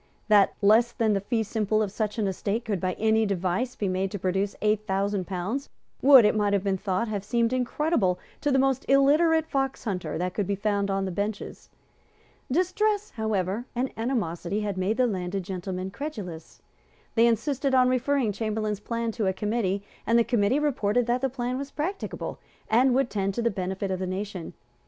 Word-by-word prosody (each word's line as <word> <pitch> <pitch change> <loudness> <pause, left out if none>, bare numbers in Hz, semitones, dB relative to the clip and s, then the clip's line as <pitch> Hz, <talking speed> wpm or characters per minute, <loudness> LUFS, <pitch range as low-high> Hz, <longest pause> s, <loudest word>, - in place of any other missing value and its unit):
That 205 -2 +5
less 225 +4 +5
than 225 -3 +1
the 195 - 0
fee 225 +2 0
simple 215 0 0
of 200 - -3
such 210 +1 -2
an 215 - 0
estate 200 +4 -2
could, 205 -4 -1
by 185 -1 0
any 220 +2 +2
device, 195 +4 -1
be 205 - -2
made 190 +1 0
to 205 - -4
produce 190 +2 -1
eight 215 0 +1
thousand 195 -1 -1
pounds, 200 +9 -3 0.3
would, 265 -4 +8
it 210 - +3
might 205 -1 +1
have 200 -2 +1
been 195 -2 0
thought, 195 +3 -1
have 205 -3 -3
seemed 235 +3 +1
incredible 250 - +1 0.2
to 290 - +1
the 270 - +3
most 265 -1 +2
illiterate 305 +4 +4
foxhunter 265 - -2
that 180 +2 -2
could 205 -3 -1
be 200 - 0
found 200 0 0
on 195 0 0
the 190 - -3
benches. 200 +3 -4 0.8
Distress, 410 +6 +1
however, 215 0 -1
and 255 +2 -1
animosity 210 -5 -2
had 205 -2 -2
made 190 +4 0
the 255 - +4
landed 190 -3 -2
gentlemen 185 0 -4
credulous. 200 - -7 0.5
They 230 0 +5
insisted 265 +4 +1
on 255 -1 +5
referring 255 -2 +1
Chamberlayne's 215 -1 -2
plan 230 +1 -2
to 215 -2 -1
a 190 - +1
committee; 200 -1 -1 0.2
and 230 - +4
the 235 - +5
committee 235 +1 +2
reported 245 -6 +1
that 245 +1 0
the 270 - +1
plan 250 0 -3
was 280 0 -5
practicable, 350 +9 -4 0.3
and 250 +3 +4
would 265 -2 +1
tend 195 -1 -1
to 235 - -1
the 235 - +2
benefit 190 0 -3
of 185 - -2
the 185 - -2
nation. 185 -2 -5
215 Hz, 190 wpm, -26 LUFS, 195-250 Hz, 0.8 s, would